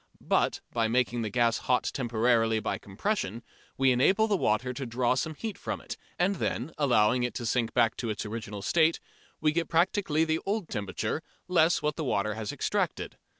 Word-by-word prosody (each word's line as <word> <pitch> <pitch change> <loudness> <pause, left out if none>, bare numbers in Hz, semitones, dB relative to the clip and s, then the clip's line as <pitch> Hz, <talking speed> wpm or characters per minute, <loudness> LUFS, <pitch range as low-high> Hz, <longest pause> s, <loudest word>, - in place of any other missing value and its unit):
But - - +2
by 115 -2 +2
making 120 0 +1
the 110 - -2
gas 115 +1 +2
hot 125 -1 +1
temporarily 115 -2 +2
by - - -2
compression 115 - -3 0.3
we 135 -1 +4
enable 190 - +4
the 210 - +2
water 125 - 0
to 135 +2 -5
draw 120 +1 +1
some 155 +5 -2
heat 220 +4 -5
from - - -4
it, - - -7 0.2
and 190 +2 +1
then, 130 0 -2
allowing 125 -4 +3
it 125 0 -2
to 120 - -4
sink 115 0 0
back 115 -3 +3
to 115 - -3
its 105 +1 -3
original 105 -2 -6
state, 160 +6 +3 0.4
we 155 - +3
get 165 +2 -1
practically 165 -2 +2
the 160 0 0
old 200 -3 -2
temperature, 105 +7 -3 0.3
less 175 -2 +3
what 150 0 -1
the 160 - -2
water 110 -5 0
has 110 -1 -4
extracted. - - -2
125 Hz, 190 wpm, -28 LUFS, 115-160 Hz, 0.4 s, we